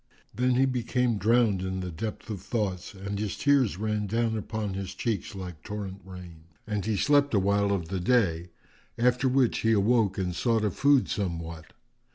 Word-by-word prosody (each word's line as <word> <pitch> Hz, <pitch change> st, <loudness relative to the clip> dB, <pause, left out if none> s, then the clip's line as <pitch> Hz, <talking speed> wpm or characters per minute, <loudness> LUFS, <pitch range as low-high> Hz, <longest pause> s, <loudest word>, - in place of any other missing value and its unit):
Then 125 Hz, +3 st, +1 dB
he 130 Hz, +2 st, +4 dB
became 125 Hz, -2 st, 0 dB
drowned 110 Hz, -2 st, +3 dB
in 95 Hz, 0 st, -3 dB
the 90 Hz, -1 st, -4 dB
depth 105 Hz, +6 st, -5 dB
of 100 Hz, -4 st, -5 dB
thoughts 100 Hz, -3 st, -3 dB
and 100 Hz, +1 st, -5 dB
his 105 Hz, -2 st, -3 dB
tears 140 Hz, -9 st, +3 dB
ran 105 Hz, 0 st, -1 dB
down 115 Hz, +2 st, 0 dB
upon 110 Hz, -1 st, -3 dB
his 95 Hz, -1 st, -5 dB
cheeks 105 Hz, -5 st, -3 dB
like 90 Hz, -5 st, -7 dB
torrent 100 Hz, -2 st, -6 dB
rain; 90 Hz, -3 st, -11 dB, 0.2 s
and 105 Hz, -2 st, -2 dB
he 110 Hz, 0 st, -1 dB
slept 145 Hz, +1 st, +3 dB
a -, -, +5 dB
while 100 Hz, +1 st, +2 dB
of 90 Hz, -5 st, -2 dB
the 95 Hz, -, -2 dB
day, 90 Hz, -5 st, +1 dB, 0.5 s
after 125 Hz, +2 st, +2 dB
which 130 Hz, -2 st, +2 dB
he 115 Hz, 0 st, +2 dB
awoke 105 Hz, -1 st, +2 dB
and 90 Hz, -2 st, -2 dB
sought 115 Hz, +2 st, +1 dB
of 100 Hz, -, 0 dB
food 140 Hz, -2 st, +4 dB
somewhat. 85 Hz, -6 st, -4 dB
105 Hz, 185 wpm, -27 LUFS, 95-120 Hz, 0.5 s, a